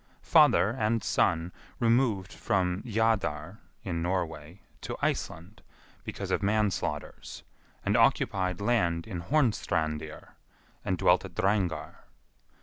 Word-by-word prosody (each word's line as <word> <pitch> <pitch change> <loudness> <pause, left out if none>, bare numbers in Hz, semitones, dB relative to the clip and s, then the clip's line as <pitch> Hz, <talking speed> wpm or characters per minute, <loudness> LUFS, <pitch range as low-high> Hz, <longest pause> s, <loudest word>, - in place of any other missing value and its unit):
Father 105 - +5
and 115 -3 0
son 85 +2 +1 0.3
removed 115 -5 +1
from 90 -1 0
Jadar 105 -6 0 0.2
(in 85 -3 -3
Norway) 85 -1 -3 0.2
to - - -5
Iceland, 95 +6 -3 0.4
because - - -5
of - - +1
manslaughters, 105 0 -2 0.4
and - - +2
occupied 90 -2 +2
land 90 -7 +1
in 90 -6 -5
Hornstrandir, 80 - -1 0.5
and 95 - -1
dwelt 90 +1 +3
at 95 -3 -10
Drangar. 95 -6 0
95 Hz, 105 wpm, -28 LUFS, 85-110 Hz, 0.5 s, Father